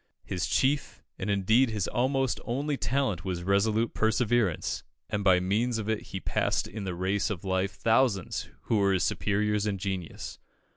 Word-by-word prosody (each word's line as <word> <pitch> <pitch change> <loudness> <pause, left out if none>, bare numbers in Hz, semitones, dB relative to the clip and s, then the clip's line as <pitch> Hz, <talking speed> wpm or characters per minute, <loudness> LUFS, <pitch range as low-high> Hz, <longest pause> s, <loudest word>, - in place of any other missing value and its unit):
His 90 -2 -2
chief 140 +2 0 0.2
and 95 - -3
indeed 110 +6 +3
his 105 -3 -1
almost 130 +1 +1
only 140 +5 -1
talent 130 -11 0
was 90 -2 -3
resolute 105 +4 +2
perseverance, 110 -4 +1 0.3
and 105 0 -1
by 95 -2 +5
means 110 +6 +1
of 110 -2 -4
it 110 -1 -2
he 95 - -5
passed - - 0
in 105 -1 -6
the 90 -2 -3
race 95 +3 0
of 100 -5 -4
life 95 +1 0
thousands 115 -4 +1
who 115 - +1
were 100 -1 +3
his 90 - +1
superiors 105 +2 +1
in 100 -2 -1
genius. 95 -3 -5
105 Hz, 165 wpm, -28 LUFS, 95-115 Hz, 0.3 s, by